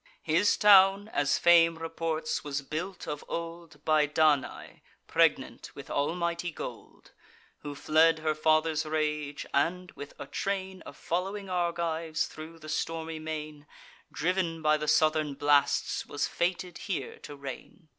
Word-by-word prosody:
His 170 Hz, +6 st, +3 dB
town, 200 Hz, 0 st, +6 dB
as 145 Hz, -9 st, +1 dB
fame 165 Hz, -1 st, +5 dB
reports, 165 Hz, -1 st, -3 dB
was 145 Hz, -1 st, -3 dB
built 175 Hz, +7 st, -5 dB
of 150 Hz, -1 st, -4 dB
old 165 Hz, -3 st, -7 dB
By 155 Hz, -1 st, +3 dB
Danae, 150 Hz, -2 st, 0 dB, 0.2 s
pregnant -, -, +1 dB
with -, -, -9 dB
almighty 170 Hz, +3 st, -1 dB
gold, 160 Hz, -, -9 dB, 0.5 s
Who 145 Hz, -1 st, -7 dB
fled 160 Hz, +3 st, +4 dB
her 155 Hz, 0 st, 0 dB
father's 155 Hz, 0 st, +2 dB
rage, 150 Hz, -2 st, -2 dB
and, 180 Hz, +5 st, 0 dB
with 145 Hz, -, -10 dB
a 145 Hz, -, -7 dB
train 190 Hz, +3 st, -3 dB
Of -, -, -11 dB
following 195 Hz, +3 st, -3 dB
Argives, 170 Hz, -3 st, -1 dB
thro' 160 Hz, +1 st, -10 dB
the 155 Hz, -1 st, -12 dB
stormy 160 Hz, 0 st, -3 dB
main, 155 Hz, -1 st, -6 dB, 0.4 s
Driv'n 170 Hz, -1 st, -1 dB
by 155 Hz, 0 st, +4 dB
the 150 Hz, 0 st, -4 dB
southern 155 Hz, -1 st, +2 dB
blasts, 145 Hz, 0 st, +2 dB
was -, -, -1 dB
fated 175 Hz, 0 st, -2 dB
here 195 Hz, -5 st, -4 dB
to 145 Hz, -, -10 dB
reign. 140 Hz, +3 st, -9 dB
160 Hz, 135 wpm, -29 LUFS, 150-170 Hz, 0.5 s, town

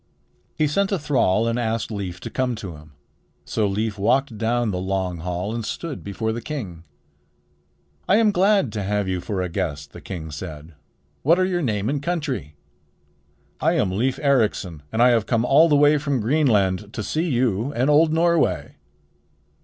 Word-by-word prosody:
He 155 Hz, -, +2 dB
sent 195 Hz, +7 st, 0 dB
a 195 Hz, -, +2 dB
thrall 125 Hz, -, +1 dB
and 115 Hz, +1 st, 0 dB
asked 115 Hz, -1 st, -2 dB
Leif 95 Hz, -4 st, -5 dB
to -, -, -7 dB
come 130 Hz, -2 st, -1 dB
to 95 Hz, -7 st, -7 dB
him. 75 Hz, 0 st, -15 dB, 0.5 s
So 110 Hz, -2 st, 0 dB
Leif 105 Hz, +1 st, -2 dB
walked 130 Hz, +4 st, +1 dB
down 115 Hz, +1 st, 0 dB
the 90 Hz, -, -2 dB
long 95 Hz, -1 st, -2 dB
hall 90 Hz, +5 st, -3 dB
and 115 Hz, -1 st, -3 dB
stood 145 Hz, +7 st, -5 dB
before 110 Hz, +3 st, -3 dB
the 115 Hz, +1 st, -4 dB
king. 100 Hz, -, -6 dB, 1.2 s
"I 195 Hz, -, +6 dB
am 220 Hz, -1 st, +4 dB
glad 195 Hz, -, +3 dB
to 105 Hz, -, -2 dB
have 100 Hz, 0 st, -1 dB
you 90 Hz, -1 st, -2 dB
for 95 Hz, +1 st, -2 dB
a -, -, -2 dB
guest," 75 Hz, -3 st, -4 dB
the -, -, -10 dB
king 80 Hz, -5 st, -7 dB
said. 80 Hz, 0 st, -8 dB, 0.5 s
"What 165 Hz, +5 st, +4 dB
are 185 Hz, -, +3 dB
your 180 Hz, -2 st, -1 dB
name 105 Hz, -7 st, -1 dB
and 140 Hz, +2 st, -1 dB
country?" 145 Hz, -, -3 dB, 1.0 s
"I -, -, +2 dB
am 90 Hz, -, +1 dB
Leif 125 Hz, +7 st, 0 dB
Ericsson, 105 Hz, -, +1 dB
and 115 Hz, +2 st, +2 dB
I 125 Hz, -, +7 dB
have 115 Hz, -3 st, +2 dB
come 115 Hz, -1 st, +1 dB
all 155 Hz, +6 st, +5 dB
the 150 Hz, -, +4 dB
way 145 Hz, +1 st, +5 dB
from 140 Hz, -2 st, -1 dB
Greenland 105 Hz, -, +1 dB
to 110 Hz, -, -4 dB
see 160 Hz, -, -1 dB
you 120 Hz, -1 st, 0 dB
and 125 Hz, +3 st, +1 dB
old 155 Hz, +2 st, +5 dB
Norway." 170 Hz, 0 st, +1 dB
115 Hz, 185 wpm, -23 LUFS, 95-145 Hz, 1.2 s, I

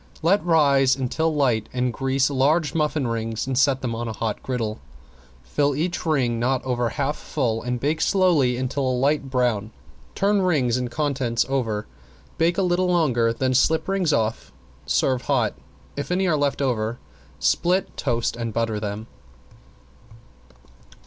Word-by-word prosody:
Let 190 Hz, +5 st, +3 dB
rise 140 Hz, -6 st, +4 dB
until 140 Hz, +5 st, -1 dB
light, 125 Hz, -8 st, +1 dB
then 125 Hz, 0 st, 0 dB
grease 135 Hz, +2 st, 0 dB
large 145 Hz, +2 st, +2 dB
muffin 150 Hz, -3 st, 0 dB
rings 115 Hz, -1 st, -3 dB
and 135 Hz, 0 st, -2 dB
set 130 Hz, 0 st, +3 dB
them 120 Hz, -2 st, -1 dB
on 115 Hz, +1 st, -4 dB
a 110 Hz, -, -4 dB
hot 110 Hz, 0 st, -3 dB
griddle. 115 Hz, -4 st, -3 dB, 0.6 s
Fill 140 Hz, -, 0 dB
each 170 Hz, +3 st, -2 dB
ring 125 Hz, -7 st, +1 dB
not 130 Hz, +2 st, 0 dB
over 120 Hz, -2 st, 0 dB
half 145 Hz, +2 st, -2 dB
full 115 Hz, -6 st, -2 dB
and 125 Hz, 0 st, -3 dB
bake 150 Hz, +5 st, -1 dB
slowly 165 Hz, -11 st, +3 dB
until 130 Hz, +2 st, -2 dB
a 125 Hz, -, 0 dB
light 140 Hz, +1 st, +1 dB
brown, 120 Hz, -5 st, 0 dB, 0.5 s
turn 200 Hz, 0 st, +2 dB
rings 145 Hz, -10 st, +2 dB
and 125 Hz, -1 st, -2 dB
contents 130 Hz, -4 st, 0 dB
over, 115 Hz, -6 st, -1 dB, 0.5 s
bake 170 Hz, +1 st, +2 dB
a 195 Hz, -, +2 dB
little 180 Hz, 0 st, +1 dB
longer, 130 Hz, -10 st, +2 dB
then 130 Hz, +3 st, -1 dB
slip 160 Hz, +5 st, +2 dB
rings 190 Hz, -4 st, +1 dB
off. 110 Hz, -4 st, -1 dB, 0.4 s
Serve 130 Hz, -2 st, +1 dB
hot. 120 Hz, -7 st, +1 dB, 0.4 s
If 145 Hz, -, -4 dB
any 190 Hz, +2 st, +1 dB
are 165 Hz, -, +2 dB
left 145 Hz, -1 st, 0 dB
over, 115 Hz, -3 st, -1 dB, 0.4 s
split, 180 Hz, +2 st, +1 dB
toast 120 Hz, -4 st, -1 dB
and 115 Hz, -1 st, -4 dB
butter 115 Hz, -1 st, -1 dB
them. 105 Hz, +1 st, -5 dB
130 Hz, 155 wpm, -23 LUFS, 120-150 Hz, 0.6 s, rise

